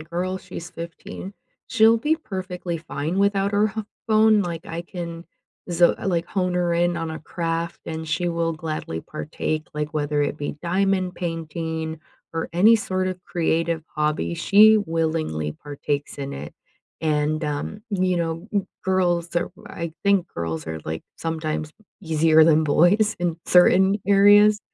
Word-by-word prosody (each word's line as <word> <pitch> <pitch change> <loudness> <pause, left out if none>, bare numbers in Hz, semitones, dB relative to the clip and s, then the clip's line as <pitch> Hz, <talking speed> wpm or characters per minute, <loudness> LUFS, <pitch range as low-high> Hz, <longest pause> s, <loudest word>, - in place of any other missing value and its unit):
girl, 175 +4 -3
she's 175 -2 -9
15. 170 +3 -8 0.4
She'll 225 +1 +5
be 300 +7 +1
perfectly 185 - -5
fine 160 +2 -3
without 200 0 +2
her 210 +1 +3
ho 220 +1 -5 0.2
phone, 215 -1 +5
like, 170 -2 -5
I 165 +1 -5
can 170 -1 -7 0.5
z 175 0 +4 0.2
like, 175 -3 0
hone 180 -2 -1
her 175 -1 +1
in 175 0 +1
on 165 -1 -3
a 160 - -6
craft 165 +1 -3
and 160 -1 -5
she 175 +3 0
will 165 -1 0
gladly 155 - -4
partake, 155 - -4
like, 150 0 -4
whether 145 0 0
it 145 +1 0
be 145 -1 -4
diamond 185 +1 +1
painting 160 -1 -4 0.3
or 165 0 -3
any 210 +7 +6
sort 185 -3 -1
of 185 -1 -6
creative 165 -1 0
hobby, 150 - -1
she 215 - +6
willingly 160 - -1
partakes 145 0 -4
in 140 0 -4
it, 75 +2 -7 0.5
and 155 0 0
um, 150 +8 -4
you 185 -2 +1
know, 165 +3 -3 0.4
girls 175 -2 +1
are 175 - 0 0.2
I 170 -1 -5
think 200 -3 +3
girls 80 -1 -4
are, 80 0 -5
like, 80 0 -4
sometimes 155 -1 -3 0.3
easier 160 -2 +4
than 160 -1 +4
boys 180 +8 +4
in 170 -2 0
certain 190 +3 +5
areas. 205 +1 +6
170 Hz, 150 wpm, -23 LUFS, 155-185 Hz, 0.5 s, any